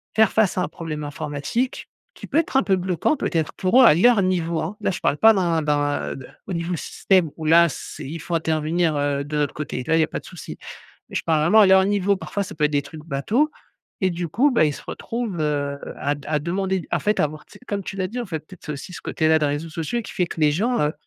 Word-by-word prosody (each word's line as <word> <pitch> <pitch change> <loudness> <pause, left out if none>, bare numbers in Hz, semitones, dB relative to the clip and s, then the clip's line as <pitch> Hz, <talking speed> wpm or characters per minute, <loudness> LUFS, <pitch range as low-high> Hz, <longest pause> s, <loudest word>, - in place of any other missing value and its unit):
faire 220 -2 +5
face 215 -4 +2
à - - +2
un - - 0
problème 155 -3 -6
informatique, 145 - -3 0.3
qui - - -10
peut 290 - +2
être 300 -4 0
un - - +4
peu 190 0 +2
bloquant, 185 - 0
peut-être, 165 - -1
pour 210 +8 +4
eux, 255 - +8
à - - +8
leur 225 +3 +5
niveau, 170 -3 0
hein. 160 +6 -3
Là, - - +1
je 180 - -4
parle - - +1
pas 225 +6 +7
d'un 170 -4 +1
d'un, 145 - 0
heu, 70 - -10 0.2
au - - -5
niveau 170 +1 -3
du - - -2
système, 185 -6 +1
où 160 - -6
là 170 +2 +6
c'est 150 - -8
il 160 +5 -6
faut 170 +2 -3
intervenir, 160 0 0
heu, 145 -1 0
de 150 +1 -4
notre 145 -2 0
côté. 140 -4 -4
Là, 160 - +3
il 165 - +4
y - - +5
a 155 - 0
pas - - -4
de - - -18
souci. 175 -6 -9 0.5
Mais - - -6
je - - 0
parle 160 -2 +2
vraiment 175 +8 +4
à - - +7
leur 190 0 +6
niveau. 200 0 +2
Parfois, 200 +1 -3
ça - - -9
peut 150 - -5
être 150 - -5
des 145 -1 +1
trucs 155 +1 -11
bateaux 205 - 0 0.5
et 185 - +3
du 175 0 -3
coup, 255 - +3
bah, 235 -10 +4
ils 150 - +1
se - - -10
retrouvent, 230 -6 -4
heu, 145 -2 -1 0.2
à 145 - 0
d 145 - -13
à 150 -1 +1
demander, 190 +3 -2
en - - +2
fait, 210 0 +1
à - - +4
avoir, 150 +1 -6
tu - - -22
sais, - - -13
comme 200 -2 -2
tu - - -6
l'as 185 -1 -1
dit, 245 - -6
en 235 - -4
fait, 160 -5 -4
peut-être, 175 +3 -16
c'est 150 - -3
aussi 140 +6 -9
ce - - -8
côté-là 160 0 +2
des 150 - +1
réseaux 145 +3 -2
sociaux, 165 +9 -3
qui - - -9
fait 180 - 0
que 165 - -7
les 150 -1 +5
gens, 230 +10 0
heu, 150 0 +1
165 Hz, 280 wpm, -23 LUFS, 150-195 Hz, 0.5 s, eux